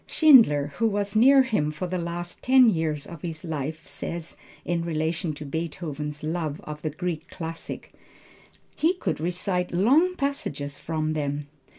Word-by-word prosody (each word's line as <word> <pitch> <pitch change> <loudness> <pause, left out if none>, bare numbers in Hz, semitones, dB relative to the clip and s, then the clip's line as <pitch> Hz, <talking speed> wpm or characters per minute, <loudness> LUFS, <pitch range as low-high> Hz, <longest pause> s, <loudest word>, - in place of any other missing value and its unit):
Schindler, 185 - +6
who 230 - +3
was 205 -1 -1
near 265 +4 +7
him 210 -13 0
for 155 +4 -4
the 180 0 -2
last 175 +1 -5
ten 255 -3 +6
years 160 -4 -1
of 170 -3 -10
his 160 -3 -5
life 155 -1 -4
says 170 -1 -5 0.3
in 175 -1 0
relation 165 +1 -1
to 150 +1 -8
Beethoven's 150 -1 -4
love 155 -2 -2
of 150 0 -7
the 155 - -1
Greek 165 +1 -4
classics. 165 -1 -6 0.9
"He 335 +4 +2
could 360 - -2
recite 180 +2 -1
long 280 - +4
passages 145 - -3
from 155 -1 -2
them. 145 -1 -3
165 Hz, 155 wpm, -26 LUFS, 155-200 Hz, 0.9 s, near